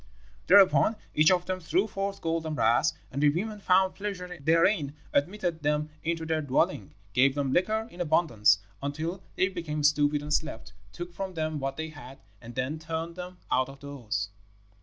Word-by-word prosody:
Thereupon 200 +3 +6 0.2
each 155 +1 +5
of 180 -1 +2
them 185 0 -2
threw 180 +3 +1
forth 195 -1 -4
gold 165 -1 -1
and 155 - -3
brass, 120 +5 +3 0.2
and 140 - -3
the 150 - +6
women 205 +8 -2
found 190 -1 +3
pleasure 180 -3 -5
therein, 160 -1 +2 0.2
admitted 175 +2 0
them 150 +1 0
into 165 0 -1
their 160 -1 0
dwelling, 140 - 0 0.2
gave 135 +2 +4
them 140 -2 0
liquor 220 +5 +1
in 175 - -7
abundance, 150 -11 +3 0.2
until 160 +6 -3
they 185 - +3
became 160 -5 -4
stupid 145 0 +3
and 150 0 -2
slept, 115 - -2 0.2
took 175 0 -7
from 190 +1 -5
them 155 -1 -2
what 135 0 -3
they 160 0 -4
had, 135 -3 -11 0.2
and 120 0 -10
then 140 +5 -2
turned 165 +1 -4
them 180 0 -8
out 130 +1 +2
of 135 0 -12
doors. 120 -8 -4
160 Hz, 180 wpm, -28 LUFS, 145-180 Hz, 0.2 s, Thereupon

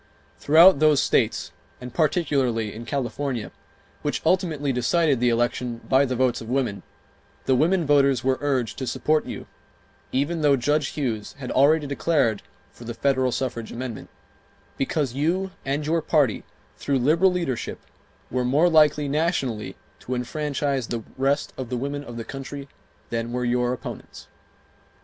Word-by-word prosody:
Throughout 160 +2 +7
those 155 -2 +5
states, - - +1 0.3
and 125 -1 -9
particularly 140 - +1
in 115 +2 -8
California, 130 -1 -3 0.5
which - - -2
ultimately 155 -7 +1
decided 140 +3 +2
the 125 0 +3
election 120 0 0
by 135 +1 +4
the 130 -1 -2
votes 125 -1 +1
of 115 - -8
women, 125 -6 -1 0.6
the 130 - +3
women 165 +6 +2
voters 140 -3 +3
were 130 0 +1
urged 135 -5 -1
to 130 - -3
support 155 +4 0
you, - - -6 0.7
even 155 +5 0
though 145 -2 +5
Judge 145 +3 +1
Hughes 115 -7 -2
had 130 -3 -6
already 150 +3 +4
declared 140 -6 +1 0.3
for - - -14
the 120 0 -6
federal 130 -1 +1
suffrage 120 -3 -3
amendment, 120 -2 -6 0.7
because 135 -2 -1
you 175 +7 0
and 140 +2 -1
your 165 +2 +1
party, 145 -8 +1 0.3
through 140 -1 0
liberal 160 +9 +3
leadership, 170 -9 -3 0.5
were 125 0 0
more 145 +8 +3
likely 150 -2 +4
nationally 140 -7 -1 0.2
to 130 - -4
enfranchise 140 0 -2
the 115 -2 -4
rest 135 +2 0
of 130 -3 -5
the 125 - -2
women 140 +3 -3
of 120 -4 -9
the 115 - -5
country 135 +1 -7 0.4
than 115 0 -2
were 125 0 -2
your 120 0 +1
opponents. 125 - -8
135 Hz, 150 wpm, -24 LUFS, 125-150 Hz, 0.7 s, Throughout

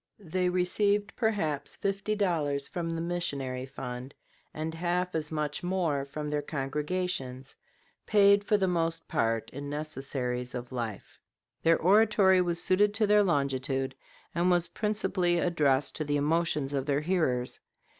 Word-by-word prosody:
They 180 +2 0
received 200 +4 +1
perhaps 200 - -1
fifty 200 +2 -1
dollars 150 -8 0
from 170 -3 -4
the 165 0 -2
missionary 140 -7 -3
fund 125 0 -7 0.4
and 155 +1 -4
half 180 +2 -1
as 155 -1 -1
much 150 -2 -2
more 175 -6 0
from 150 +2 -5
their 150 0 0
congregations, 145 -2 -3 0.5
paid 200 -1 +5
for 210 +1 +2
the 190 -2 +1
most 165 -2 0
part 115 -1 0
in 140 +2 -6
necessaries 135 -4 -3
of 125 0 -6
life. 115 -5 -5 0.4
Their 165 0 +4
oratory 195 0 +5
was 175 -1 0
suited 205 +2 +2
to 220 0 +3
their 210 0 +5
longitude, 135 -5 0 0.4
and 175 +1 +2
was 175 -1 +2
principally 205 -5 0
addressed 150 -6 +1
to 155 - -1
the 145 -1 0
emotions 150 -1 +1
of 135 0 -1
their 145 0 +1
hearers. 150 -8 0
160 Hz, 145 wpm, -29 LUFS, 140-185 Hz, 0.5 s, paid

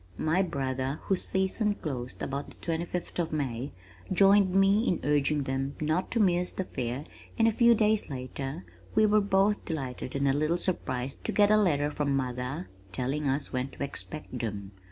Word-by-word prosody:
My 160 +4 +2
brother 135 -4 -2
whose 190 -2 +1
season 200 +2 +1
closed 130 -8 -5
about 140 +1 -3
the - - -14
twenty 165 0 -2
fifth 180 0 -4
of 170 - 0
May, 135 -3 -2 0.4
joined 195 0 +5
me 195 +3 +4
in 175 - +1
urging 145 0 +2
them 135 +1 -2
not 155 +4 0
to 235 - 0
miss 180 -3 +3
the 190 - -2
fair 125 -4 -4 0.3
and 225 - +4
a - - +4
few 235 +2 +5
days 215 -2 +2
later 135 -3 -5 0.3
we 215 - +5
were 210 0 +4
both 200 +1 +2
delighted 130 -5 -4
and 140 0 +1
a 135 - +4
little 155 +4 +1
surprised 135 -8 -2
to - - 0
get 205 0 +4
a - - +7
letter 150 -8 +2
from 145 -2 0
mother 130 +5 -3 0.2
telling 135 +8 -1
us 140 +2 -2
when 130 +1 -1
to - - -6
expect 140 -1 -6
them. 100 -4 -4
150 Hz, 185 wpm, -29 LUFS, 135-190 Hz, 0.4 s, a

